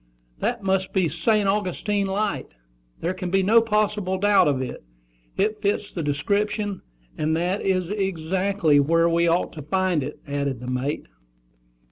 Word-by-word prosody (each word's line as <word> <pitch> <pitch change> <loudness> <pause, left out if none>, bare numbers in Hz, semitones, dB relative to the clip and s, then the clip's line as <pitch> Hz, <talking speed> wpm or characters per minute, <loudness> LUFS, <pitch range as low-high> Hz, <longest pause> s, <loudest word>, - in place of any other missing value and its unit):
'" - - -36
"That 240 -3 -1
must 190 -1 0
be 185 -3 +2
St. 200 +6 +1
Augustine 200 0 0
Light: 205 +2 -1 0.5
there 170 +3 -1
can 185 -1 -5
be 195 +1 +2
no 225 +4 +6
possible 210 -3 0
doubt 205 -1 +4
of 140 -3 +1
it. 130 -1 -5 0.5
It 215 +1 0
fits 205 0 -1
the 170 - -4
description; 200 +7 -1 0.4
and 155 +1 +1
that 180 +4 -1
is 185 -2 0
exactly 190 -4 +1
where 165 +4 +3
we 170 0 +2
ought 170 +2 +1
to 155 - -7
find 185 +1 0
it," 145 +3 -6
added 140 -3 -2
the 125 - -8
mate. 125 +4 -2
185 Hz, 160 wpm, -24 LUFS, 160-205 Hz, 0.5 s, no